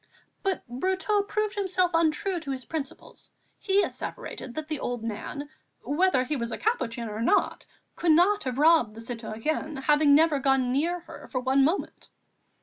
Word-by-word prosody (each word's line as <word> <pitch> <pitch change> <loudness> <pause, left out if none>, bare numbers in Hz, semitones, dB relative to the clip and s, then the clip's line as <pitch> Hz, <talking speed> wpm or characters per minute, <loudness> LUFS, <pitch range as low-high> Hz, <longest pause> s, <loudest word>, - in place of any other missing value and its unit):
But 390 -2 -1
Brotteaux 375 - 0
proved 425 0 -1
himself 375 -4 +1
untrue 330 +3 +1
to 310 -4 -8
his 260 -2 -4
principles; 295 -2 -7 0.3
he 400 0 +2
asseverated 245 - -5
that 310 -1 -4
the 305 -3 -3
old 245 -2 -3
man, 230 +6 -5 0.4
whether 295 -3 +2
he 295 +4 -2
was 235 -3 -3
a - - -3
Capuchin 250 - -1
or 215 +1 -5
not, 360 - +1 0.3
could 335 -2 +3
not 380 +4 +3
have 255 -1 -3
robbed 300 -8 +4
the - - -9
citoyenne, 235 +6 -4
having 295 0 +5
never 310 -1 +4
gone 270 -2 +2
near 335 +7 0
her - - -12
for 255 - -1
one 265 +2 +3
moment. 325 +8 -2
300 Hz, 165 wpm, -27 LUFS, 255-355 Hz, 0.4 s, having